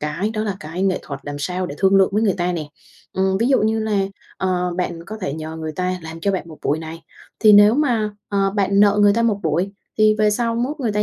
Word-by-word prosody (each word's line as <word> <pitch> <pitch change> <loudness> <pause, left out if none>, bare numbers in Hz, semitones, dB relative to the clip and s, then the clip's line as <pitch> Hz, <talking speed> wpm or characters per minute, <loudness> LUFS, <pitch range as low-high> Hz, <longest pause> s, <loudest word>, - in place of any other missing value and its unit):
cái 150 +8 -2
đó 215 - -1
là 200 -3 -3
cái 165 +4 -5
nghệ 195 -2 +1
thuật 140 -2 -7
làm 145 0 -6
sao 180 +5 -2
để 145 - -7
thương 195 0 +4
lượng 195 -1 +5
với 215 +2 +1
người 200 -4 +2
ta 180 +1 0
nè. 155 -4 -4 0.4
Ừm, 190 0 +1
ví 235 +4 +1
dụ 265 - +3
như 220 +1 +1
là, 215 -2 0 0.4
ờ, 180 -2 -1
bạn 170 -2 -3
có 215 - -6
thể 140 - -3
nhờ 160 0 -6
người 160 -1 -5
ta 185 +2 -2
làm 160 +1 -8
cho 200 - +1
bạn 185 -3 -3
1 155 - -12
buổi 150 - +1
này, 160 +1 -8 0.4
thì 215 -2 +7
nếu 205 +2 +7
mà, 240 -8 +1 0.2
ờ, 195 -1 +1
bạn 200 0 +1
nợ 205 0 +4
người 205 0 +6
ta 230 +2 +1
1 220 -3 +1
buổi 170 +5 0 0.3
thì 215 0 +5
về 215 -1 +3
sau 230 +2 0
mốt 260 +6 -2
người 230 -5 -1
ta 210 0 +1
195 Hz, 265 wpm, -20 LUFS, 165-215 Hz, 0.4 s, thì